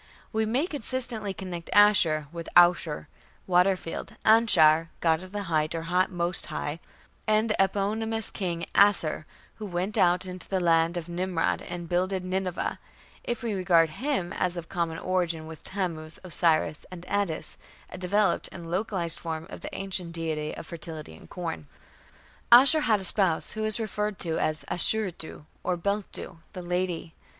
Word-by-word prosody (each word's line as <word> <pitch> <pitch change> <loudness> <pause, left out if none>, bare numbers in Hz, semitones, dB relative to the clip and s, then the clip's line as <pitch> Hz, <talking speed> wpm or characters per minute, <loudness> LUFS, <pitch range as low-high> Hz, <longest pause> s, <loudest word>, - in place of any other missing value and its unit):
We 220 0 +1
may 255 +8 +1
consistently 245 - -3
connect 180 -3 -7
Ashur 175 -8 +5
with 170 -1 -7
Aushar, 175 -4 +4 0.4
"water 185 +1 +3
field", 165 - -7
Anshar, 165 -8 +5
"god 160 -1 +2
of 185 0 -10
the 205 0 -3
height", 155 -3 0
or 165 0 -4 0.2
"most 175 -1 0
high", 155 0 -4 0.5
and 215 +1 +2
with - - +1
the - - +7
eponymous 220 +3 -2
King 170 -3 -3
Asshur 175 -6 +3 0.3
who 215 - -6
went 185 +3 -2
out 180 +1 +3
on 185 0 -7
the 190 - 0
land 165 0 +2
of 170 -1 -5
Nimrod 175 0 -1
and 175 -1 -6
"builded 185 +2 -1
Nineveh", 185 -1 -2 0.4
if 240 +1 -3
we 230 -2 -1
regard 175 -4 +3
him 210 - -2
as 180 -1 -1
of 170 -1 -7
common 170 -3 -2
origin 170 -3 -1
with 160 -1 -10
Tammuz, 165 -5 -4
Osiris, 165 -3 +1
and 180 -1 -10
Attis 200 -5 -2 0.3
a - - -7
developed 195 +1 +1
and 170 -2 -9
localized 185 -3 0
form 160 -1 -5
of - - -8
the - - -7
ancient 185 -3 -3
deity 155 -2 -3
of - - -7
fertility 160 - -8
and - - -16
corn. 165 -4 -5 0.8
Ashur 270 +6 +8
had 220 -8 +2
a - - -7
spouse 185 -3 +2
who 215 0 -4
is 215 +1 +3
referred 210 -2 -2
to 165 -3 -1
as 155 +1 -1
Ashuritu, 180 -5 +2 0.2
or 180 -1 -1
Beltu, 200 -2 -3
"the 180 -3 -7
lady". 175 -2 -2
180 Hz, 160 wpm, -27 LUFS, 165-205 Hz, 0.8 s, Ashur